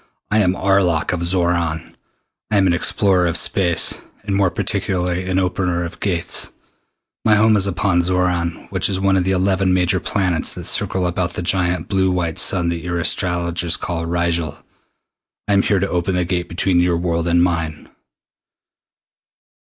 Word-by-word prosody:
"I 110 - +3
am 95 -3 +2
Arlok 90 -5 +1
of 90 - -2
Xoran. 85 -2 -1 0.6
I 105 - +1
am 95 - +4
an 90 - +3
explorer 90 +1 +2
of 85 0 +3
Space, 85 -4 +1 0.2
and 100 -1 -2
more 100 -2 +2
particularly 90 -1 -2
an 95 - 0
Opener 90 -2 -1
of 85 0 -9
Gates. 90 -4 -2 0.7
My 110 - +4
home 110 +1 +4
is 100 -1 +3
upon 95 -1 +1
Xoran, 90 -1 -1
which 95 0 +1
is 95 -1 -1
one 95 0 +2
of 90 -2 +1
the 95 - +1
eleven 95 0 +1
major 90 0 +1
planets 90 -5 -1
that - - -7
circle 95 -1 0
about 90 0 -2
the 90 - -4
giant 90 -2 0
blue 95 -2 +1
white 85 -3 -1
sun 85 -3 +1
that 85 -1 -3
your 85 +1 -3
astronomers 85 0 0
call 85 -2 -4
Rigel. 85 -3 -1 0.9
I 100 - +1
am 100 - +4
here 100 - +1
to 95 +1 0
open 90 +1 -1
the 90 -1 0
Gate 90 0 -2
between 90 +1 +1
your 90 -1 +2
world 85 -1 -1
and 85 0 +3
mine." 80 -4 -2
90 Hz, 170 wpm, -19 LUFS, 85-95 Hz, 0.9 s, am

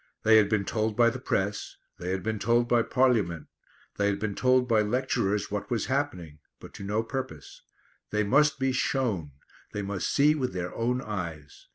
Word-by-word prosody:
They 110 0 +6
had 105 -2 +4
been 105 -3 +1
told 110 0 -1
by 120 -1 +5
the 130 - -6
press; 100 -4 -2 0.2
they 90 - -4
had 95 0 -2
been 110 -1 -2
told 120 +3 +2
by 120 -1 +3
Parliament; 110 - +1 0.5
they 100 - +2
had 100 -1 +1
been 110 -1 -3
told 130 +2 +3
by 115 -3 +3
lecturers 105 -3 0
what 105 -1 -3
was 120 -2 -1
happening, 90 - -3 0.2
but - - -12
to - - -9
no 105 +3 -1
purpose. 115 - -6 0.5
They 105 0 +1
must 150 +8 +3
be 135 0 +1
shown; 110 - -1 0.4
they 105 - -3
must 100 -1 -2
see 145 +2 +4
with 130 -8 -2
their 90 -1 -4
own 125 +3 -1
eyes. 85 -8 -6
110 Hz, 190 wpm, -27 LUFS, 100-125 Hz, 0.5 s, They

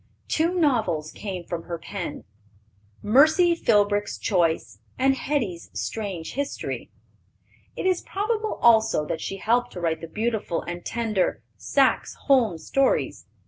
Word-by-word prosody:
Two 335 +3 +1
novels 220 - +1
came 185 -4 -6
from 170 -1 -5
her 170 - -4
pen, 170 -1 -6 0.8
Mercy 315 - +5
Philbrick's 205 -8 +2
Choice 165 - 0 0.2
and 270 +1 +3
Hetty's 240 - -2
Strange 195 -7 -4
History. 280 +1 -4 0.9
It - - -4
is 370 -2 +2
probable 430 +2 -2
also 220 -9 +5
that 160 - -3
she 195 - -4
helped 240 +4 +1
to - - -6
write 165 -2 -1
the 165 - -6
beautiful 215 -2 -2
and 175 0 -6
tender 220 -5 -1
Saxe - - +1
Holm 240 - +3
Stories. 270 +12 0
215 Hz, 130 wpm, -25 LUFS, 175-270 Hz, 0.9 s, Mercy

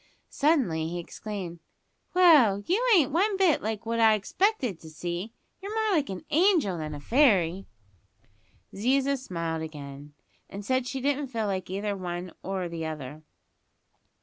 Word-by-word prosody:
Suddenly 255 - +1
he 175 +2 -4
exclaimed, 175 -1 -6 0.6
"Well, 280 - +6
you 395 +8 +1
ain't 310 -8 +3
one 385 +6 +1
bit 370 -6 +3
like 220 +1 -4
what 230 +1 -1
I 220 -1 +6
expected 250 - 0
to 160 - -12
see. 175 +6 -5 0.3
You're 405 +3 -6
more 395 - +2
like 295 -3 0
a 190 -2 -6
angel 315 - +3
than 155 -1 -5
a - - -7
fairy." 195 - +2 1.1
Ziza 270 +6 +1
smiled 165 -10 -4
again, 145 -2 -9 0.3
and 200 +1 -8
said 260 0 0
she 265 0 -4
didn't 285 +1 0
feel 230 -4 -3
like 190 -3 -3
either 200 +3 -3
the 200 - -2
one 175 -1 -5
or 190 -1 -3
the 165 -1 -5
other. 155 -2 -6
205 Hz, 155 wpm, -27 LUFS, 170-275 Hz, 1.1 s, Well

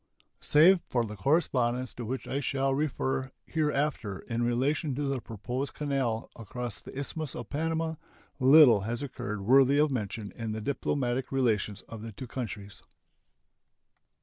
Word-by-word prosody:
Save 170 +5 +6
for 120 -2 +1
the 105 -1 -7
correspondence 125 - +1
to 120 - -6
which 130 +4 -4
I 140 - -1
shall 135 -1 0
refer 135 -2 -1
hereafter 150 - -1
in 115 -1 -3
relation 130 +4 0
to 145 - -2
the 135 -3 -1
proposed 125 +6 -5
canal 135 -6 -1
across 120 0 -6
the - - -10
Isthmus 145 +1 -4
of 120 - -7
Panama, 160 +1 -1 0.4
little 130 -4 +8
has 115 +6 -3
occurred 120 -6 -5
worthy 135 +3 +6
of 150 0 +3
mention 105 -3 -3
in 115 -2 -5
the 110 - -3
diplomatic 130 0 -1
relations 110 -6 0
of 115 -2 -9
the 115 0 -7
two 130 - -7
countries. 105 -5 -6
130 Hz, 150 wpm, -29 LUFS, 115-140 Hz, 0.4 s, little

